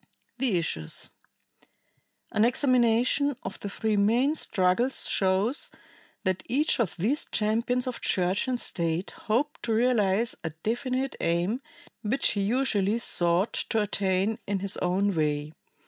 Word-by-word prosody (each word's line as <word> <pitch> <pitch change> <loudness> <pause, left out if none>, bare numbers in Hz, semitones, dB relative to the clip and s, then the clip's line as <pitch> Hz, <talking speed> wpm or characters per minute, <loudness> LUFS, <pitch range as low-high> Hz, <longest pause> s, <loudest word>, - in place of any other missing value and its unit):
The 245 -8 +2
Issues. 80 - -1 1.2
An 215 - +2
examination 250 +2 +3
of 190 - -6
the 200 - -5
three 215 +2 -1
main 235 +8 +3
struggles 225 -1 +2
shows 195 +8 +1 0.5
that 185 -2 0
each 280 +4 +2
of 220 -7 0
these 235 - +1
champions 230 +4 0
of 255 -2 -4
Church 185 +5 +1
and 250 -1 -1
State 170 -1 -2
hoped 265 +8 -2
to 230 - -1
realize 225 -2 +2
a 160 - -2
definite 255 +4 -1
aim 175 +9 0 0.4
which 245 +5 +1
he 205 - -1
usually 215 -2 +1
sought 175 -3 0
to 225 - -1
attain 200 0 0
in 200 -1 0
his 200 0 0
own 195 +3 +1
way. 150 -1 0
215 Hz, 130 wpm, -27 LUFS, 190-245 Hz, 1.2 s, examination